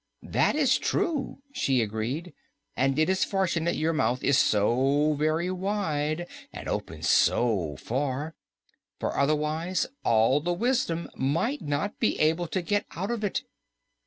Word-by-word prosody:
"That -, -, +1 dB
is 280 Hz, -4 st, +3 dB
true," 285 Hz, -4 st, -1 dB
she 135 Hz, -, +1 dB
agreed, 120 Hz, -, -4 dB, 0.4 s
"and 135 Hz, +2 st, +1 dB
it 155 Hz, -, +3 dB
is 190 Hz, 0 st, +2 dB
fortunate 175 Hz, -3 st, 0 dB
your 160 Hz, +1 st, 0 dB
mouth 125 Hz, -5 st, 0 dB
is 140 Hz, -, +4 dB
so 135 Hz, +9 st, +3 dB
very 155 Hz, +4 st, 0 dB
wide 175 Hz, -5 st, -1 dB, 0.3 s
and -, -, -8 dB
opens -, -, -3 dB
so 95 Hz, -11 st, +2 dB
far, 140 Hz, -, -3 dB, 0.7 s
for -, -, -2 dB
otherwise 155 Hz, +5 st, 0 dB, 0.2 s
all 115 Hz, +6 st, +3 dB
the 175 Hz, +3 st, 0 dB
wisdom 215 Hz, -6 st, 0 dB
might 165 Hz, -, 0 dB
not 145 Hz, +8 st, -2 dB
be 225 Hz, -, +1 dB
able 160 Hz, +3 st, +2 dB
to 185 Hz, +2 st, -2 dB
get 205 Hz, +3 st, 0 dB
out 195 Hz, +6 st, -2 dB
of 230 Hz, -2 st, -3 dB
it." 205 Hz, -, -1 dB
155 Hz, 140 wpm, -27 LUFS, 140-185 Hz, 0.7 s, is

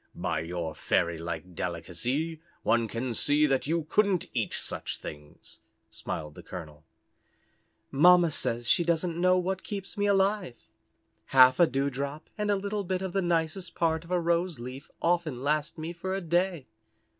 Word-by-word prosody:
"By -, -, -1 dB
your 85 Hz, 0 st, -4 dB
fairy 85 Hz, -1 st, 0 dB
like 85 Hz, +2 st, -5 dB
delicacy 120 Hz, -, -3 dB, 0.2 s
one 115 Hz, -1 st, +2 dB
can 115 Hz, +3 st, -3 dB
see 145 Hz, +6 st, +3 dB
that 135 Hz, -2 st, +1 dB
you 165 Hz, 0 st, 0 dB
couldn't 200 Hz, -1 st, +2 dB
eat -, -, -1 dB
such -, -, -4 dB
things," 75 Hz, 0 st, -10 dB, 0.3 s
smiled 75 Hz, -2 st, -5 dB
the -, -, -11 dB
colonel. 80 Hz, -4 st, -9 dB, 1.1 s
"Mamma 175 Hz, +3 st, +6 dB
says 120 Hz, -4 st, -1 dB
she 170 Hz, -, +4 dB
doesn't 170 Hz, 0 st, 0 dB
know 185 Hz, 0 st, +5 dB
what 190 Hz, +1 st, -1 dB
keeps 200 Hz, +1 st, -5 dB
me 205 Hz, -, +2 dB
alive. 195 Hz, -, +1 dB, 0.7 s
Half 130 Hz, -1 st, +6 dB
a 170 Hz, -, +7 dB
dewdrop 140 Hz, +2 st, -3 dB
and 210 Hz, -1 st, -2 dB
a 205 Hz, -, +4 dB
little 200 Hz, +1 st, -2 dB
bit 185 Hz, 0 st, -2 dB
of 190 Hz, -2 st, -4 dB
the 195 Hz, -, +2 dB
nicest 170 Hz, +1 st, -1 dB
part 160 Hz, -1 st, +1 dB
of 170 Hz, -, -15 dB
a 180 Hz, -1 st, +2 dB
rose 170 Hz, -2 st, 0 dB
leaf 130 Hz, +4 st, -8 dB
often 165 Hz, -7 st, +1 dB
lasts 150 Hz, +2 st, 0 dB
me 160 Hz, +2 st, -5 dB
for 190 Hz, +2 st, -3 dB
a 195 Hz, -, -2 dB
day. 175 Hz, -3 st, 0 dB
160 Hz, 165 wpm, -28 LUFS, 125-180 Hz, 1.1 s, a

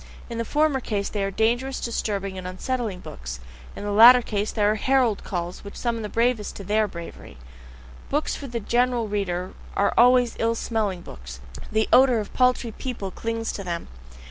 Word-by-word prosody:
In 230 Hz, -, -4 dB
the 230 Hz, -, -1 dB
former 300 Hz, +1 st, +2 dB
case 205 Hz, -5 st, -2 dB
they 205 Hz, -2 st, -2 dB
are 195 Hz, -, 0 dB
dangerous, 240 Hz, +6 st, 0 dB
disturbing, 200 Hz, -4 st, -2 dB
unsettling 185 Hz, +2 st, -3 dB
books, 65 Hz, 0 st, -8 dB, 0.4 s
in -, -, -7 dB
the 205 Hz, -, -2 dB
latter 240 Hz, +4 st, +9 dB
case 210 Hz, -1 st, -2 dB
they 215 Hz, -, -1 dB
are 205 Hz, +1 st, +4 dB
herald 245 Hz, -1 st, +1 dB
calls 175 Hz, -1 st, -4 dB
which 200 Hz, -, -9 dB
summon 235 Hz, -2 st, -2 dB
the 210 Hz, -, -5 dB
bravest 230 Hz, -2 st, 0 dB
to 200 Hz, -, -8 dB
THEIR 210 Hz, +2 st, +1 dB
bravery. 170 Hz, -, -10 dB, 0.7 s
Books 295 Hz, +2 st, 0 dB
for 280 Hz, -, -7 dB
the 235 Hz, -2 st, -3 dB
general 240 Hz, +1 st, +1 dB
reader 185 Hz, -3 st, -2 dB, 0.2 s
are 200 Hz, -, +2 dB
always 245 Hz, 0 st, +5 dB
ill 230 Hz, 0 st, +1 dB
smelling 215 Hz, -6 st, -2 dB
books, 65 Hz, -, -10 dB, 0.3 s
the 220 Hz, 0 st, +1 dB
odour 255 Hz, -1 st, +6 dB
of 210 Hz, -2 st, -4 dB
paltry 250 Hz, -2 st, +2 dB
people 220 Hz, -5 st, -5 dB
clings 225 Hz, +3 st, -3 dB
to 200 Hz, -, -6 dB
them. 170 Hz, -2 st, -4 dB
220 Hz, 180 wpm, -24 LUFS, 195-245 Hz, 0.7 s, latter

